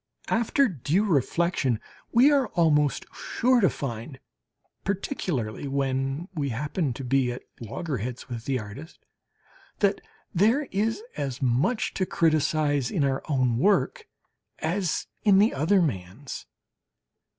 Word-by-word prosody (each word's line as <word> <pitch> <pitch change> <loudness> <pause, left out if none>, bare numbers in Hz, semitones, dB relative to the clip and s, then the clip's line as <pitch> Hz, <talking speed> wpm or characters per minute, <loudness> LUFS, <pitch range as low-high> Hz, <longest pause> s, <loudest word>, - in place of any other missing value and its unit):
After 235 +4 +3
due 175 - 0
reflection 160 - +1 0.3
we 255 +5 +6
are 275 -4 +3
almost 150 -4 +3
sure 250 0 +2
to 190 - +5
find 125 +1 -5 0.6
particularly 165 - -2
when 135 +3 -1
we 145 -5 -1
happen 145 +5 -1
to 135 - -7
be 130 0 +2
at 125 - -7 0.2
loggerheads 125 - -4
with 120 -2 -6
the 135 -2 0
artist 115 +9 -9 0.7
that 200 -1 +2 0.3
there 225 - +3
is 220 - 0
as 135 -3 -3
much 135 - +1
to 185 - -1
criticize 155 -4 +2
in 160 - 0
our 135 -1 +1
own 130 -5 +2
work 210 - +2 0.5
as 175 +1 -1 0.2
in 200 -3 +6
the 210 +3 +4
other 175 +7 +3
man's. 110 - -4
150 Hz, 125 wpm, -26 LUFS, 130-195 Hz, 0.7 s, we